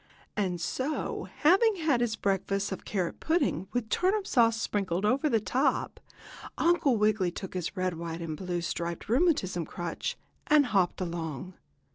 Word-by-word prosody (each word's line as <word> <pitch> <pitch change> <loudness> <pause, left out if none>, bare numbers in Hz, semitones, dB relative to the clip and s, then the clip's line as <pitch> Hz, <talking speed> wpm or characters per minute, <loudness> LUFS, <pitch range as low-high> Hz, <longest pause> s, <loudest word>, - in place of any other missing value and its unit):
And 185 -4 -1
so, 265 - -2 0.2
having 390 +8 +5
had 310 -8 +1
his 230 -2 +1
breakfast 195 0 -1
of 190 - -6
carrot 185 -5 -2
pudding, 315 - 0
with 245 -2 -1
turnip 385 - +1
sauce 230 - +3
sprinkled 195 -4 -1
over 270 +7 +2
the 225 - +3
top, 260 +5 0 0.6
Uncle 320 -7 +3
Wiggily 210 -3 +2
took 190 +2 -7
his 185 +2 -4
red, 185 0 0
white 165 0 -5
and 165 -2 -4
blue 175 +1 -3
striped 170 0 -3
rheumatism 235 - +2
crutch, 175 +1 -4 0.3
and 295 -1 +5
hopped 195 -6 +1
along. 170 -1 -4
205 Hz, 150 wpm, -29 LUFS, 175-270 Hz, 0.6 s, having